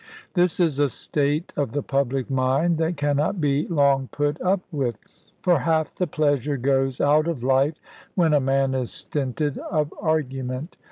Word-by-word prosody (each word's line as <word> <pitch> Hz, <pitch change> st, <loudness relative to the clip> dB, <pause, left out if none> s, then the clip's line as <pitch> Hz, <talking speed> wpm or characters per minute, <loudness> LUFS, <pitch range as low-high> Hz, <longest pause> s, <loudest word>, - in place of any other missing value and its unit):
This 180 Hz, -1 st, +2 dB
is 160 Hz, -6 st, +2 dB
a 145 Hz, -1 st, +3 dB
state 145 Hz, +6 st, -1 dB
of 140 Hz, -6 st, -1 dB
the 145 Hz, -, -1 dB
public 135 Hz, -2 st, -1 dB
mind 135 Hz, +6 st, +1 dB
that 165 Hz, +1 st, 0 dB
cannot 145 Hz, +5 st, 0 dB
be 145 Hz, -1 st, +1 dB
long 140 Hz, -5 st, +2 dB
put 145 Hz, +1 st, -1 dB
up 185 Hz, +1 st, +2 dB
with; 130 Hz, -7 st, -1 dB, 0.5 s
for 175 Hz, -4 st, +4 dB
half 160 Hz, +2 st, 0 dB
the 180 Hz, -, -1 dB
pleasure 145 Hz, -2 st, 0 dB
goes 135 Hz, 0 st, +1 dB
out 150 Hz, +2 st, +3 dB
of 155 Hz, -8 st, -3 dB
life 135 Hz, +4 st, +2 dB, 0.4 s
when 165 Hz, -4 st, +3 dB
a 145 Hz, -, +5 dB
man 135 Hz, 0 st, +1 dB
is 130 Hz, -2 st, -2 dB
stinted 145 Hz, +1 st, -2 dB
of 155 Hz, -4 st, -2 dB
argument. 135 Hz, -2 st, -2 dB
145 Hz, 165 wpm, -24 LUFS, 135-155 Hz, 0.5 s, a